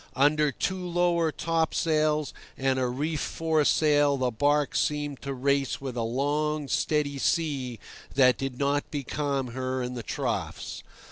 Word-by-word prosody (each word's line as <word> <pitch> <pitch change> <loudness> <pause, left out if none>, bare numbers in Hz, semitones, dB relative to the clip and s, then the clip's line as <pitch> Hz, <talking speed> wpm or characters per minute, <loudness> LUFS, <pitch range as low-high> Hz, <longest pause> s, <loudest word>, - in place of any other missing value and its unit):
Under 150 +2 +3
two 185 +7 -2
lower 175 -2 +1
topsails 155 -2 +1 0.2
and 135 0 +1
a 130 - +1
reefed 145 +5 -2
foresail 150 -2 +2
the 130 -1 0
barque 145 +5 +1
seemed 145 -3 -1
to 140 - -4
race 140 +1 0
with 135 -3 -5
a 120 - -1
long, 145 +5 0
steady 145 -1 0
sea 135 -7 0 0.4
that 125 -3 +5
did 135 -2 -3
not 140 +1 0
becalm 140 -2 -2
her 130 0 -2
in 125 0 -4
the 120 - -4
troughs. - - -3
145 Hz, 140 wpm, -27 LUFS, 130-155 Hz, 0.4 s, that